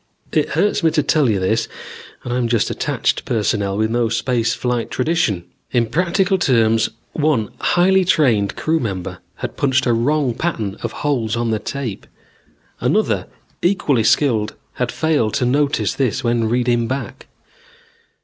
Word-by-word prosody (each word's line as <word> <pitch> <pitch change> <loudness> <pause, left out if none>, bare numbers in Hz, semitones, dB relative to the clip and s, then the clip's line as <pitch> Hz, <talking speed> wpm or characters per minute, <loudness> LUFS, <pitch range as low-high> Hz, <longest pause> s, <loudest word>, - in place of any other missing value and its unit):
It - - +1
hurts 205 - +1
me 165 - +4
to 155 -1 +1
tell 150 -3 +2
you 105 -3 +1
this 110 +5 0 0.6
and 120 - -3
I'm 125 -1 0
just 115 -2 +1
attached - - -1
personnel 100 -3 0
with 110 +1 0
no 120 -1 +1
space 120 0 0
flight 125 -2 -2
tradition. 125 - 0 0.3
In 120 -2 +2
practical 180 - +1
terms, 115 -6 +3 0.2
one 145 -9 +1
highly 190 +2 +3
trained 120 - +2
crew 160 +1 0
member 95 - -4 0.2
had - - -6
punched 135 -1 +2
a 120 - +3
wrong 130 +2 +1
pattern 115 - -2
of - - -3
holes 120 -7 0
on 115 -1 -1
the 110 - 0
tape. 120 -3 -5 0.7
Another - - +1 0.3
equally 165 - +2
skilled 115 -3 +2 0.2
had 125 -1 -2
failed 150 -9 0
to 125 - +1
notice 140 +3 +1
this 130 -5 -1
when 115 -2 +1
reading 120 -1 +1
back. 130 -3 -5
120 Hz, 150 wpm, -19 LUFS, 110-150 Hz, 0.7 s, me